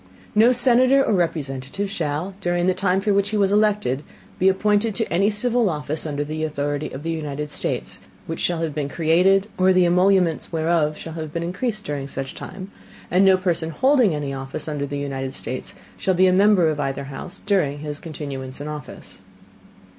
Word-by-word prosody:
No 225 +4 +6
Senator 255 +2 +4
or - - +1
Representative 160 0 -2
shall, 165 +1 -2
during 175 0 0
the 185 - +3
Time 185 0 +1
for 205 +1 +1
which 200 0 +2
he 215 - -1
was 200 -1 +3
elected, 210 -10 +2 0.4
be 190 - +5
appointed 205 +2 +1
to - - 0
any 195 +4 +3
civil 230 +1 +1
Office 150 0 -3
under 145 -1 -2
the 155 +1 -4
authority 145 -1 -2
of 135 +3 -8
the 165 - -2
United 150 -2 -4
States, - - -3 0.3
which 165 - -5
shall 170 -2 0
have 160 -3 -2
been 145 -1 -2
created, 180 +6 +3
or 185 0 +5
the 185 -1 +4
Emoluments 180 -1 +2
whereof 160 -2 +1
shall 165 - -8
have 160 -2 -6
been 170 +1 -3
increased 215 +5 -3
during 140 -2 -3
such 135 -1 -5
time; 190 +1 -8 0.4
and 185 +2 +4
no 190 -1 +6
Person 170 -3 -1
holding 250 - +3
any 145 -2 -3
Office 135 +2 -4
under 145 -2 -2
the 145 - -4
United 135 -2 -4
States, 130 - -5 0.2
shall 190 - 0
be 185 +2 +5
a 185 - +4
Member 195 -3 +5
of 150 -1 -2
either 140 -1 -2
House 140 +8 -8
during 180 -9 +1
his 150 0 -6
Continuance 140 -5 -7
in 145 - -6
Office. 150 -2 -9
170 Hz, 190 wpm, -22 LUFS, 145-195 Hz, 0.4 s, No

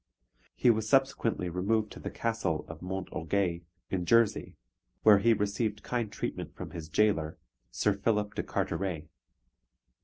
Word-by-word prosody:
He 120 - +5
was 110 -1 -1
subsequently 135 -8 +2
removed 105 +5 0
to - - -9
the - - -5
Castle 115 -9 -1
of 80 -1 -9
Mont 95 +1 -4
Orgueil, 85 0 -1 0.3
in 95 -2 0
Jersey, 115 -2 +3 0.5
where 105 -2 +8
he 115 +4 +4
received 105 0 0
kind 120 -4 -2
treatment - - -5
from - - -7
his 80 -2 -7
jailor, 80 -4 +2 0.3
Sir 105 +11 +1
Philip 105 +1 0
de - - -1
Carteret. 90 -5 -2
105 Hz, 145 wpm, -30 LUFS, 90-110 Hz, 0.5 s, where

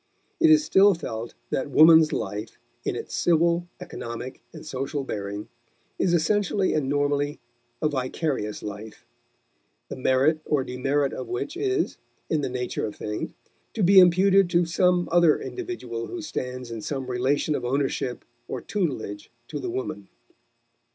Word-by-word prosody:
It 330 -1 +5
is 315 -1 +6
still 200 -6 +5
felt 115 -8 -6 0.2
that 135 - -1
woman's 160 +2 +7
life, 105 +2 -4 0.3
in - - -2
its - - -6
civil, 170 +1 +2
economic, 130 -7 -7
and 155 -1 -11
social 140 0 -3
bearing, 100 -3 -5 0.5
is 175 -2 +3
essentially 195 +3 +1
and 145 -3 0
normally 145 0 0 0.4
a - - +4
vicarious 130 -5 -2
life, 105 +1 -8 0.8
the - - -5
merit 130 +4 +2
or 145 -3 +1
demerit 135 +2 0
of 130 - -5
which 285 - -4
is, 390 +1 -1 0.3
in 155 - +2
the 135 - -2
nature 125 -2 -3
of 105 - -8
things, 105 0 -4 0.4
to 215 - 0
be 190 +2 +8
imputed 190 +1 +5
to 175 0 +3
some 180 +1 +2
other 170 -2 +5
individual 355 - -5
who 350 -2 -6
stands 125 - -5
in 115 -1 -5
some 135 +3 -3
relation 130 +4 0
of - - -2
ownership 130 -1 -1 0.2
or 130 - -4
tutelage 125 - -3 0.2
to 150 - -4
the - - -4
woman. 100 -5 -4
145 Hz, 150 wpm, -25 LUFS, 125-175 Hz, 0.8 s, be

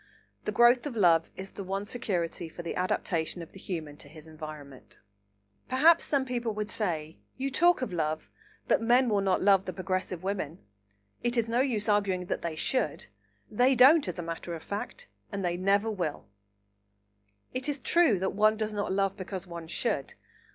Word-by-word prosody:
The - - -1
growth 240 +3 +5
of 265 - -6
love 170 -6 +4
is 190 0 -7
the 200 - -7
one 195 +2 -3
security 175 -7 -2
for 175 - -9
the 170 - -4
adaptation 175 -2 -1
of 165 - -13
the 195 - -13
Human 155 -6 -5
to - - -9
his 155 +1 -13
environment. 155 -4 -10 0.7
Perhaps 320 +6 +5
some 275 -3 +1
people 240 -4 -2
would 210 0 -2
say, 160 -7 -2 0.2
"You 270 +1 -2
talk 345 +1 +3
of 210 - -4
love, 155 -2 -2 0.4
but - - +3
men 245 +2 +4
will 205 -2 +2
not 190 -2 +1
love 195 -1 +5
the 185 - -4
progressive 185 -1 -3
women. 185 -5 -3 0.7
It 240 0 0
is 230 -1 +2
no 230 +2 +1
use 230 -6 0
arguing 200 -3 +1
that - - -3
they 170 -2 -3
should; 255 +11 -1 0.5
they 250 +5 +4
don't, 270 +2 +7
as 180 - -4
a 175 - -4
matter 170 +1 -5
of 160 - -9
fact, 205 +1 -6 0.2
and 200 -2 -3
they 175 0 0
never 200 +4 +2
will." 175 -8 -3 1.3
It 255 +3 -2
is 290 - -1
true 305 - +3
that 190 +1 -1
one 215 +1 +3
does 215 0 -2
not 205 -2 -2
love 195 0 +1
because 190 -1 -6
one 170 -2 -8
should. 140 -4 -2
195 Hz, 185 wpm, -29 LUFS, 170-235 Hz, 1.3 s, don't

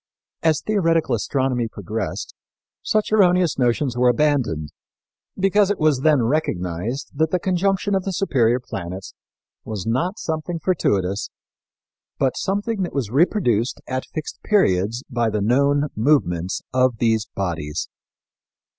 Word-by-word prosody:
As 160 -3 +2
theoretical 165 - +2
astronomy 125 +1 0
progressed, 105 0 -5 0.5
such 215 -1 0
erroneous 180 -7 +3
notions 125 +1 +1
were 125 0 +4
abandoned, 125 - +1 0.7
because 195 +1 +3
it 205 - 0
was 155 -4 +2
then 145 -3 +3
recognized 115 - -2
that 155 +2 +1
the 180 - +1
conjunction 190 +2 0
of 190 -1 +1
the 195 - -2
superior 130 - +2
planets 95 -5 -7 0.5
was 105 -5 -5
not 170 - 0
something 160 +2 -3
fortuitous, 100 - 0 0.9
but 130 -2 +1
something 205 +2 -1
that 180 - -3
was 125 -7 -2
reproduced 130 - +2
at 130 0 -3
fixed 155 -2 -6
periods 115 - +1
by 120 -3 0
the 105 -1 -1
known 140 +7 +2
movements 95 - +1
of 130 -2 +2
these 110 -2 +1
bodies. 80 -6 -3
135 Hz, 130 wpm, -22 LUFS, 110-170 Hz, 0.9 s, were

